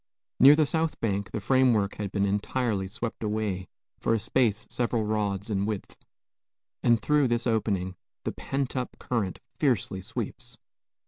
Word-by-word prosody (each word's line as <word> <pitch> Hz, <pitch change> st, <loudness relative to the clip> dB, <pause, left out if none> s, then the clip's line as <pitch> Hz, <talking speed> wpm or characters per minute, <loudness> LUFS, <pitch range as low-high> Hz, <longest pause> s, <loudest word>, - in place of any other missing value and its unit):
Near 140 Hz, +3 st, +9 dB
the 155 Hz, 0 st, +4 dB
south 160 Hz, +1 st, -1 dB
bank 100 Hz, -3 st, -1 dB
the -, -, -3 dB
framework 115 Hz, -3 st, +3 dB
has 105 Hz, -2 st, -3 dB
been 100 Hz, 0 st, +1 dB
entirely 105 Hz, 0 st, 0 dB
swept 115 Hz, +3 st, -5 dB
away 105 Hz, -4 st, -1 dB, 0.3 s
for 115 Hz, -, +2 dB
a -, -, 0 dB
space 115 Hz, -1 st, +1 dB
several 120 Hz, -2 st, 0 dB
rods 105 Hz, -1 st, -1 dB
in 100 Hz, 0 st, 0 dB
width, 105 Hz, -3 st, -4 dB, 0.9 s
and 120 Hz, -1 st, +4 dB
through 150 Hz, +3 st, +3 dB
this 120 Hz, 0 st, 0 dB
opening 100 Hz, -5 st, 0 dB, 0.3 s
the -, -, -1 dB
pent 135 Hz, -1 st, -3 dB
up 125 Hz, -1 st, -3 dB
current 110 Hz, -7 st, -2 dB, 0.2 s
fiercely 110 Hz, -, +1 dB
sweeps. -, -, -6 dB
110 Hz, 150 wpm, -28 LUFS, 100-125 Hz, 0.9 s, Near